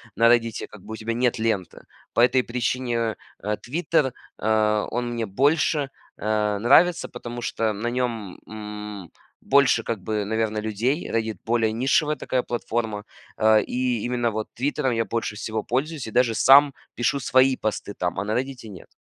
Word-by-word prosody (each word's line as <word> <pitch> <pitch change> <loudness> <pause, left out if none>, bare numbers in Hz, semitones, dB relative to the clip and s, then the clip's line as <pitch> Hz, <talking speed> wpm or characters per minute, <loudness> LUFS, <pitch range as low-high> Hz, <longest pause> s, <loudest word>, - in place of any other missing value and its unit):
на 115 0 +5
"Реддите" 115 -2 +1
как 105 -3 -14
бы 110 - -8
у - - -3
тебя 115 +1 -3
нет 120 -2 +1
ленты. 110 -5 -2 0.3
По - - 0
этой 125 0 +4
причине, 125 0 -1
э, 115 -2 -1 0.3
э, 105 +1 -1
"Твиттер", 150 -1 0 0.2
э, 105 -1 +2
он 120 0 -2
мне 115 -1 -2
больше, 145 - +1 0.3
э, 105 -1 0
нравится, 165 +9 +4
потому 120 0 -7
что 110 -2 -1
на 110 +4 -4
нём, 120 -6 -3
м, 105 -3 -8 0.3
больше 140 -4 +4
как 115 -3 -4
бы, 105 -1 -1
наверно, 110 0 -1
людей. 110 - -1
"Реддит"- 110 -3 -1
более 115 -1 +2
нишевая 135 +6 +2
такая 130 -3 -1
платформа, 115 -3 -3 0.3
э, 110 0 +5
и 125 -3 -1
именно 120 -1 0
вот 110 -1 -4
"Твиттером" 135 +1 -1
я 115 -1 +1
больше 115 -1 -3
всего 110 0 -3
пользуюсь 140 +2 -2
и 110 - -7
даже 120 -1 +2
сам 140 +3 +6 0.2
пишу 140 +4 0
свои 130 0 +3
посты 105 -1 -3
там, 90 +1 -2
а 100 - -1
на 105 +1 -2
"Реддите" 125 -3 -4
нет. 95 -4 -11
115 Hz, 175 wpm, -24 LUFS, 110-125 Hz, 0.3 s, сам